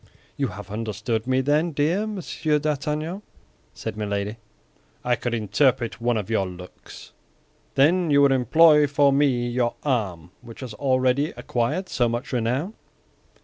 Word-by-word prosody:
"You 140 - -1
have 105 -1 -9
understood 110 +1 -3
me, 130 0 +2
then, 150 +5 +1
dear 165 +9 +1
Monsieur 170 -6 -1
d'Artagnan," 150 +4 -2 0.5
said 110 -2 -5
Milady. 105 0 -3 0.7
"I 120 0 +2
could 120 +1 -3
interpret 120 +2 +1
one 120 -1 +1
of 105 - -3
your 105 -4 0
looks." 90 0 -12 0.6
"Then 165 +5 +3
you 140 -1 +5
would 140 - +5
employ 150 +4 +5
for 145 0 +3
me 135 -4 +2
your 120 0 -1
arm 95 - -2
which 115 +2 -12
has 125 -4 -6
already 130 +4 +1
acquired 120 +10 -2
so 120 -2 +1
much 120 +4 -4
renown?" 125 - -1
125 Hz, 145 wpm, -24 LUFS, 115-145 Hz, 0.7 s, you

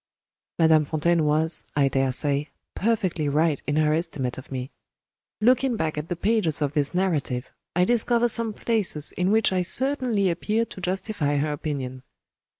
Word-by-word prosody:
Madame 160 -2 +5
Fontaine 160 +2 +1
was, 155 +2 0
I 140 -1 +3
daresay, 140 +2 0 0.3
perfectly 185 -8 0
right 150 0 +1
in 145 - 0
her 155 0 +2
estimate 150 -7 -2
of 130 - -14
me. 130 0 -5 0.7
Looking 250 +3 +3
back 160 -7 -2
at 150 +1 -4
the 175 - -1
pages 200 -4 +1
of 145 -2 -1
this 145 +3 0
narrative, 150 -9 -1 0.2
I 180 +1 +3
discover 240 +2 +3
some 230 -1 +1
places 210 -9 -1
in 180 +1 -1
which 220 -2 +3
I 185 - +1
certainly 245 0 +1
appear 215 +7 -1
to 190 - -11
justify 180 -5 -1
her 150 +1 0
opinion. 135 -4 -4
160 Hz, 155 wpm, -24 LUFS, 145-210 Hz, 0.7 s, Madame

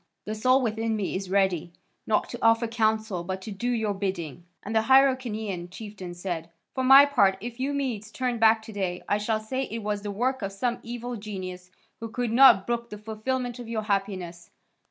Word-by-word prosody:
The 215 - -3
soul 255 +5 +3
within 225 0 -1
me 205 -3 -2
is 190 0 -4
ready, 190 -3 +1 0.4
not 215 - +1
to 240 - -6
offer 225 +1 +4
counsel, 220 -5 0
but 190 +2 -4
to 215 - -6
do 220 +5 -3
your 220 -4 0
bidding." 175 -5 -4 0.2
And 215 +2 -5
the 220 - +5
Hyrcanian 225 -8 +2
chieftain 190 -3 -8
said, 175 -2 -4 0.2
"For 260 - -2
my 270 +2 +9
part, 200 -9 +3
if 240 +2 -7
you 270 +2 -1
Medes 250 -7 -3
turn 250 -2 -2
back 220 0 +5
to 220 - -10
day 185 -3 -3
I 205 - +1
shall 215 +1 0
say 260 +5 -3
it 225 -1 -6
was 205 -1 -2
the 205 - -5
work 250 +6 -1
of 195 -1 -4
some 240 +4 -1
evil 240 +1 -5
genius, 185 -3 -7 0.3
who 230 - -6
could 245 0 -2
not 235 -5 +7
brook 235 0 -2
the 210 - -7
fulfilment 240 +4 -3
of 240 -2 -8
your 220 -2 -2
happiness. 190 -4 -3
220 Hz, 200 wpm, -26 LUFS, 195-240 Hz, 0.4 s, my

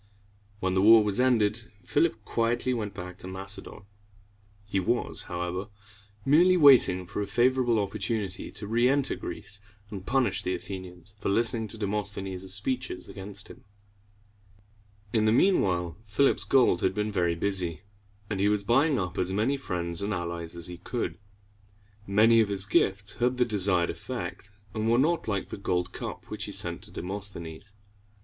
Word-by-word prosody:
When 95 0 0
the 95 - +2
war 110 +2 +8
was 105 +2 +2
ended, 115 -3 +2
Philip 145 -8 0
quietly 120 +2 0
went 105 -4 -4
back 90 -1 -8
to 90 - -7
Macedon. 95 +2 -5 0.8
He 100 -1 -1
was, 120 +6 0
however, 90 +2 -3 0.6
merely 175 +6 +5
waiting 130 - +6
for 95 - -4
a 100 - -3
favorable 125 0 +2
opportunity 100 -1 -2
to 105 - -5
reënter 125 +5 +2
Greece, 105 - -7 0.3
and 100 -3 -6
punish 125 -3 +1
the 90 - -1
Athenians 95 0 -9
for - - -2
listening 115 +2 +2
to 110 - -6
Demosthenes' 100 -3 -3
speeches 105 0 -3
against 100 0 -8
him. - - -14 1.5
In 110 -2 +2
the 110 - +4
mean 185 - +4
while, 85 -3 -1
Philip's 135 +7 +2
gold 125 -9 +4
had 95 0 +1
been 105 0 -1
very 85 -4 +1
busy, 90 -2 0 0.5
and 100 -2 -3
he 100 - +3
was 105 -1 +1
buying 135 +7 +3
up 90 -3 -3
as 90 - 0
many 110 +8 +1
friends 85 -10 -2
and 100 0 -1
allies 85 -1 -5
as 85 -1 -7
he 90 -1 -7
could. 120 +5 -4 0.9
Many 110 +4 +5
of 105 - 0
his 100 -1 0
gifts 100 0 +1
had 125 +1 +1
the 125 - +3
desired 95 -5 +2
effect, 100 -5 -6 0.2
and 110 +1 -1
were 120 - +4
not 160 +4 +1
like 100 -3 -2
the - - -5
gold 90 -2 -1
cup - - -6
which - - -4
he - - -6
sent - - -1
to - - -9
Demosthenes. 95 -1 -6
100 Hz, 165 wpm, -28 LUFS, 95-115 Hz, 1.5 s, war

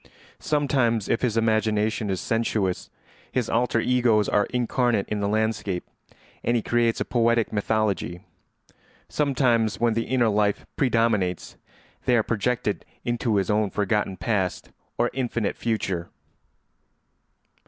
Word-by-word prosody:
Sometimes, 130 -7 +1
if 115 - 0
his 115 -3 0
imagination 110 -1 +1
is 95 -2 -1
sensuous, 110 -5 -1 0.4
his 125 -3 -1
alter 115 0 +2
egos 115 -4 +3
are 105 - +2
incarnate 120 -3 0
in 105 - -1
the 100 - 0
landscape, 110 -3 -1 0.6
and 120 - +1
he 115 - -2
creates 120 -1 +1
a - - -1
poetic 115 -2 +1
mythology; 105 -4 -1 0.9
sometimes, 120 -8 +1
when 115 -1 +2
the 115 +1 -1
inner 120 -2 +2
life 105 -1 +1
predominates, 115 -8 +1 0.5
they 125 - +4
are 110 - +3
projected 115 -1 -1 0.2
into 120 -2 0
his 100 +1 +1
own 105 -1 +2
forgotten 105 -2 -1
past 100 -6 -2 0.3
or 120 - +1
infinite 120 -5 -1
future. 95 -7 -2
110 Hz, 125 wpm, -25 LUFS, 105-120 Hz, 0.9 s, they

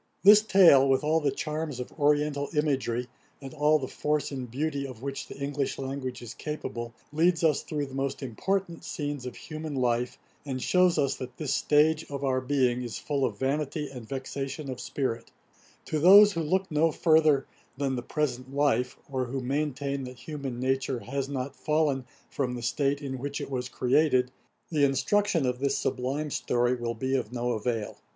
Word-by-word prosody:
This 205 +2 +9
Tale, 175 -10 +6
with 135 +2 +3
all 155 +2 +3
the 145 -2 +1
charms 150 -2 -3
of 125 - -6
oriental 145 -1 +1
imagery, 130 -5 0 0.3
and 135 0 -9
all 150 0 +4
the 135 -3 -4
force 150 +2 -1
and 130 -3 -5
beauty 140 +3 -2
of 125 -2 -10
which 140 0 -4
the - - -10
English 140 0 -2
language 130 -2 -5
is 120 -1 -7
capable, 120 -6 -5 0.2
leads 165 +2 +2
us 155 -3 +3
through 150 -2 -3
the 135 - -11
most 135 +1 -2
important 175 - -2
scenes 145 -4 -4
of 125 - -7
human 155 -1 -6
life, 125 -1 0 0.3
and 135 -3 -4
shews 180 +5 +3
us 140 -1 +2
that 125 -1 -8
this 150 -4 -1
stage 155 +2 +3
of 140 -1 -5
our 130 -1 +1
being 130 -2 +1
is 120 -2 -5
full 140 -2 -2
of 105 -5 -1
'vanity 145 +2 -2
and 120 -4 -9
vexation 135 +1 -4
of 125 - -6
spirit.' 120 -5 -3 0.6
To 155 - -1
those 200 +6 +9
who 165 - -1
look 185 +4 0
no 155 +2 +3
further 155 -4 +4 0.3
than 135 -1 0
the 120 - -3
present 130 -1 -3
life, 140 -3 +1
or 130 -2 -2
who 130 +2 -3
maintain 140 0 -2
that 125 0 -9
human 135 -2 -6
nature 130 -1 0
has 135 +2 -3
not 135 -1 -4
fallen 150 -4 0 0.2
from 125 -3 -2
the 120 - -6
state 140 +3 0
in 130 -2 -4
which 140 +2 -4
it - - -6
was 125 -1 -2
created, 130 0 +2 0.4
the 150 -3 +2
instruction 165 +5 +2
of 125 -1 -1
this 140 0 +1
sublime 135 +4 -2
story 120 -1 +1
will 120 -1 -3
be 130 +4 -1
of 120 -4 -2
no 120 0 -1
avail. 115 -1 -2
140 Hz, 185 wpm, -28 LUFS, 125-150 Hz, 0.6 s, This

